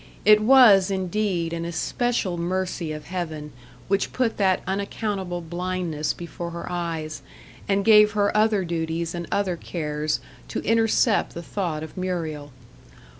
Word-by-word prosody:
It 210 0 +7
was, 215 -6 +7
indeed, 185 -3 -1
an 165 0 -3
especial 190 +3 -1
mercy 175 -1 -2
of 150 0 -7
heaven 160 -4 -5 0.3
which 195 +1 0
put 250 -3 0
that 190 -2 +2
unaccountable 195 -2 -3
blindness 175 -3 -2
before 170 0 -6
her 170 0 -6
eyes, 165 -3 -4 0.5
and 200 0 +1
gave 210 -1 +7
her 205 -1 +1
other 210 -3 +3
duties 165 0 -2
and 170 -1 -5
other 195 -3 0
cares 150 -3 -2 0.3
to - - -4
intercept 225 0 +2
the 170 - -6
thought 170 -5 -3
of 160 - -9
Muriel. 160 -6 -3
180 Hz, 135 wpm, -24 LUFS, 165-200 Hz, 0.5 s, It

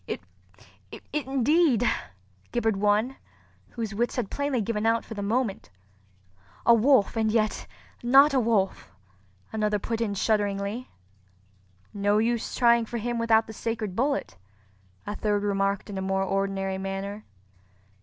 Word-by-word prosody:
"It—it—indeed!" 225 - -1 0.6
gibbered 225 -4 0
one, 210 +6 +1 0.5
whose 225 -3 -5
wits 235 +4 -1
had 235 -6 -3
plainly 285 -3 -1
given 215 0 -1
out 230 0 +1
for - - -8
the 205 - -5
moment. 215 - -1 1.0
"A 235 - +7
wolf—and 225 -2 +3
yet 215 -1 0 0.3
not 275 +4 +6
a 265 - +4
wolf!" 220 - 0 0.6
another 210 -1 +1
put 225 +3 -3
in 205 -3 -1
shudderingly. 205 +3 -1 1.0
"No 205 +1 +1
use 230 +1 0
trying 235 -2 +4
for 235 - -4
him 235 +1 -2
without 225 -1 +3
the 220 - -9
sacred 220 -3 -3
bullet," 265 - -1 0.7
a 205 - -4
third 205 -1 0
remarked 200 -1 0
in 200 -2 -5
a - - -3
more 190 0 0
ordinary 195 0 -1
manner. 195 +2 -5
215 Hz, 130 wpm, -26 LUFS, 200-235 Hz, 1.0 s, A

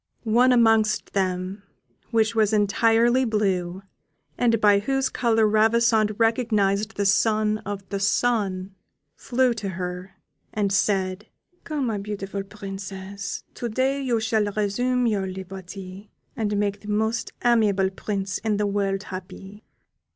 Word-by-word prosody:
One 240 +3 +4
amongst 225 -3 +3
them, 185 0 -1 0.5
which 225 -1 +2
was 220 -1 +2
entirely 230 +4 +3
blue, 195 -5 -1 0.5
and 230 -2 +2
by 205 -2 +5
whose 270 +4 0
colour 225 -4 +2
Ravissante 220 0 +3
recognised 220 -3 +1
the 200 - 0
son 215 +1 +2
of 200 -1 -5
the 200 - -2
Sun, 200 -3 0 0.4
flew 255 -1 +1
to 210 -3 -4
her, 180 +1 -6 0.4
and 200 -2 0
said, 190 +1 0 0.4
"Come, 255 -10 -2
beautiful 200 -1 -5
Princess, 195 -1 -7
to 240 - -4
day 265 +5 0
you 245 -4 0
shall 220 -1 +1
resume 215 +5 0
your 205 -4 0
liberty, 190 +1 -8 0.3
and 210 -4 -1
make 200 0 -1
the 210 - -13
most 220 +2 -1
amiable 205 -5 +3
Prince 195 0 -3
in 215 -2 -1
the 210 - 0
world 200 -1 -1
happy." 190 +3 -9
210 Hz, 130 wpm, -24 LUFS, 195-225 Hz, 0.5 s, by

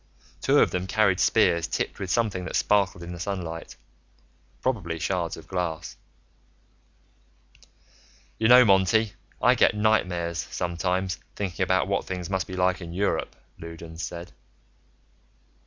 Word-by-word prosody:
Two - - +3
of - - +4
them 90 0 -2
carried 100 -3 +2
spears 85 -1 +3
tipped - - -3
with 95 - -4
something 100 -1 0
that - - -4
sparkled 100 -4 +1
in 85 - -7
the 85 - -8
sunlight, 85 -3 -5 0.8
probably 90 -11 -2
shards 85 -1 -2
of 80 - -12
glass. 90 -4 -3 2.4
"You 110 - +3
know, 125 +1 +8
Monty, 100 +2 +3 0.3
I - - +6
get - - +3
nightmares, 90 -6 +1
sometimes, 90 +1 -2 0.2
thinking 95 -4 -4
about 95 +1 +2
what 100 0 -1
things 90 0 -5
must 95 -2 -1
be 95 - -6
like 90 0 +1
in 85 -1 -7
Europe," 100 +3 -1 0.2
Loudons 85 0 -9
said. 85 +1 -6
90 Hz, 135 wpm, -26 LUFS, 85-100 Hz, 2.4 s, know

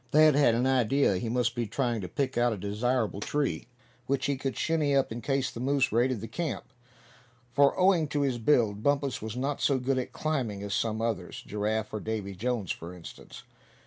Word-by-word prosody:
Thad 155 +2 +6
had 140 -5 +4
an 120 +2 +1
idea 130 -4 +3
he 110 +5 -3
must 120 0 +1
be 120 -2 -2
trying 120 -1 -1
to 90 - -5
pick 135 +8 -2
out 120 -1 +2
a - - -5
desirable 105 +1 -1
tree 145 +4 -1 0.4
which 140 0 0
he 140 - +1
could 135 0 -4
"shinny 150 -3 +1
up" 135 -3 +2
in 115 +1 -5
case 135 +2 0
the - - -8
moose 135 +1 +1
raided 120 0 +1
the 115 - -5
camp; 160 -4 -4 0.8
for 140 +4 +4
owing 180 -4 +4
to 145 0 -1
his 130 -4 0
build 110 -5 +2
Bumpus 140 0 0
was 110 +2 -5
not 140 +2 -2
so 140 - +3
good 130 +1 0
at 125 - -4
climbing 125 -10 -2
as 100 -1 -4
some 110 +1 -1
others, 110 -6 -3
Giraffe 105 +1 -2
or 110 - -2
Davy 105 -2 -4
Jones 110 0 -2
for 85 +2 -6
instance. 85 -2 -11
125 Hz, 205 wpm, -28 LUFS, 110-140 Hz, 0.8 s, Thad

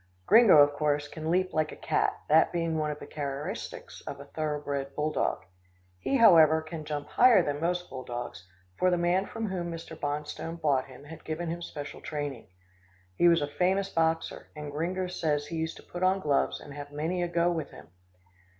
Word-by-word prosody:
Gringo, 225 -6 +7
of 145 0 +7
course, 145 0 0
can 155 +1 -5
leap 185 +2 +1
like 155 -1 0
a - - -8
cat, - - 0
that 155 +2 +5
being 165 -2 -1
one 155 -1 0
of 150 - -4
the - - -9
characteristics 140 -1 -6
of - - -6
a - - -9
thoroughbred 145 -3 -3
bull 150 +1 0
dog. - - -1 0.6
He, 275 - -1
however, 160 - +7
can 155 -1 -7
jump 150 -1 -4
higher 235 -7 +6
than 145 -1 -2
most 175 +1 -1
bull 130 -1 -7
dogs, 120 -7 -6 0.3
for 185 - +4
the 180 - +2
man 175 +3 +1
from 225 -2 -4
whom 175 -2 -3
Mr. 165 -1 -7
Bonstone 150 +2 -4
bought 140 -5 +2
him 130 +1 -13
had 160 +2 -11
given 165 +2 -4
him 170 +1 -4
special 145 -3 -7
training. 145 -7 -5 0.7
He 175 - +4
was 170 -3 +4
a - - -1
famous 190 +6 +1
boxer, 165 -2 -1
and 150 -1 -6
Gringo 175 +5 -2
says 155 -5 -1
he 165 +2 -5
used 160 0 -3
to - - -13
put 175 - -8
on 185 +1 +3
gloves 145 -6 +1
and 145 - -11
have 145 0 -8
many 160 +5 -2
a 175 - 0
go 170 0 +2
with 165 -2 -3
him. - - -14
160 Hz, 205 wpm, -29 LUFS, 145-175 Hz, 0.7 s, Gringo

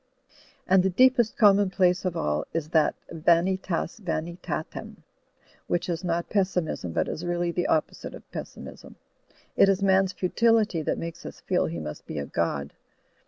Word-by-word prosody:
And 190 0 +5
the 190 - +1
deepest 245 +3 +3
commonplace 195 -4 +4
of 175 -2 -1
all 75 - -1
is 160 -2 -2
that 160 -2 +3 0.2
Vanitas 175 +6 +1
Vanitatem, 170 -3 -4 0.7
which 175 0 -1
is 170 +1 -2
not 170 -1 -1
pessimism 180 - -1
but - - 0
is 160 - -5
really 175 0 -1
the 175 +1 -1
opposite 155 - -1
of - - -12
pessimism. - - -9 0.6
It 195 - +6
is 195 0 +1
man's 190 -1 +3
futility 215 -1 +2
that - - -1
makes 165 -1 -6
us - - -9
feel - - +1
he 85 +1 -5
must 75 -2 -7
be - - -6
a 70 - -2
god. 70 -3 -2
175 Hz, 155 wpm, -26 LUFS, 160-190 Hz, 0.7 s, It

